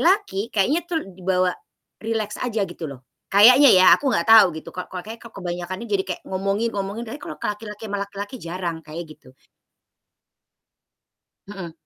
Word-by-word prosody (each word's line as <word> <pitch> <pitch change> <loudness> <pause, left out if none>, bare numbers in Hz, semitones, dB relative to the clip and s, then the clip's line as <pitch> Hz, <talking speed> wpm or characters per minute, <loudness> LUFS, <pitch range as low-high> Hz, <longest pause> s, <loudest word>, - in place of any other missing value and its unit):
Laki 345 - +1
kayaknya 245 - +1
tuh 325 -3 -2
di 190 -1 -14
bawa 185 0 +1 0.5
rileks 220 -2 -3
aja 225 -4 -1
gitu 170 -4 -7
loh, 130 -2 -11 0.2
kayaknya 250 +8 +7
ya 185 - +6
aku 285 - -1
gak 255 - +1
tau 225 -3 +8
gitu. 160 - -9
Kal 180 - -6
ko 185 - -9
kayaknya 225 +2 -9 0.2
kebanyakan 180 -1 -4
nih 235 - -10
jadi 195 -1 +1
kayak 180 - -4
ngomongin-ngomongin 200 +2 -2
tapi 235 +6 -8
kalau - - -8
laki-laki 210 0 -5
sama 205 0 -3
laki-laki 200 +4 -6
jarang, 170 0 -4
kayak 160 +2 -8
gitu. 130 -3 -20 2.1
Heeh. 190 -5 -7
200 Hz, 160 wpm, -22 LUFS, 180-225 Hz, 2.1 s, tau